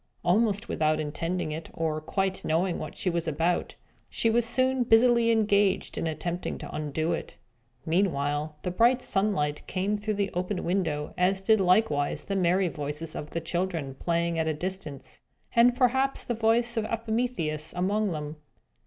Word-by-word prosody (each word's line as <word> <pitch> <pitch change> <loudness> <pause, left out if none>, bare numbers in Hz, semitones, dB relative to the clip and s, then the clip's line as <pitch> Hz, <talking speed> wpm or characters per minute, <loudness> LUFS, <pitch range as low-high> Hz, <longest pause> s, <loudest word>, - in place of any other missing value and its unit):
Almost 205 +4 +2
without 155 0 +1
intending 165 +2 -2
it, 160 +2 -6
or 155 -1 -1
quite 190 +4 -1
knowing 170 +3 0
what 155 - -7
she - - -3
was 170 -2 0
about, 165 +3 0 0.3
she 225 - +1
was 235 0 +2
soon 260 +2 +2
busily 235 0 +5
engaged 205 -3 +2
in - - -2
attempting 175 +3 -3
to - - -8
undo 155 +2 -1
it. - - -5 0.5
Meanwhile, 150 -4 0
the 180 - -2
bright 240 +7 +3
sunshine 195 -8 +1
came 195 +2 -1
through 210 +1 -2
the 200 -1 -1
open 180 +2 -2
window; 165 -5 -1
as 190 +2 +3
did 215 +2 +3
likewise 180 -6 +2
the 195 - -3
merry 185 0 +2
voices 150 +1 -5
of 150 - -5
the 170 - -3
children, 170 -7 -2
playing 170 +3 -1
at 160 - 0
a 155 - 0
distance, 160 -5 -6 0.3
and 240 +1 +6
perhaps 265 +2 +2
the 240 - -2
voice 230 +1 +1
of 220 - +1
Epimetheus 220 -10 -2
among 200 +3 0
them. 150 -1 -5
180 Hz, 160 wpm, -27 LUFS, 160-220 Hz, 0.5 s, and